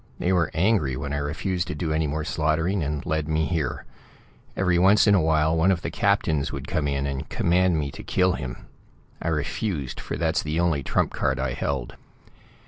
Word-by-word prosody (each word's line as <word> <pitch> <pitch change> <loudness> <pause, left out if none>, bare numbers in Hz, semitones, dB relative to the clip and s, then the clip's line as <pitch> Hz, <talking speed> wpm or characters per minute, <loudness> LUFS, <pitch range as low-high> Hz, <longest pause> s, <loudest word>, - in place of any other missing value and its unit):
They 90 - +1
were 85 -3 +2
angry 85 - +2
when 70 0 -4
I - - 0
refused 85 +5 -2
to 75 - -4
do 80 0 -2
any 80 0 +1
more 75 +2 -2
slaughtering, 80 +5 0
and 75 -1 -3
led 80 -3 -1
me 80 0 +1
here. 80 -6 -2 0.7
Every 90 -2 +2
once 100 +4 +5
in 105 - +5
a 95 - +4
while 80 0 +2
one 80 +3 +3
of 85 -3 -1
the 85 - -3
captains 80 -7 +1
would 70 0 -6
come 75 -2 -1
in 70 -1 -1
and 70 -1 -4
command 90 0 +2
me 70 -2 -2
to - - -9
kill 90 0 +2
him. 65 -8 -6 0.6
I - - -3
refused, 75 - -2
for - - -5
that's 80 0 +1
the 80 +2 -2
only 85 -5 +1
trump - - 0
card 65 0 0
I 65 -2 -1
held. 65 -1 -3
80 Hz, 205 wpm, -25 LUFS, 70-90 Hz, 0.7 s, once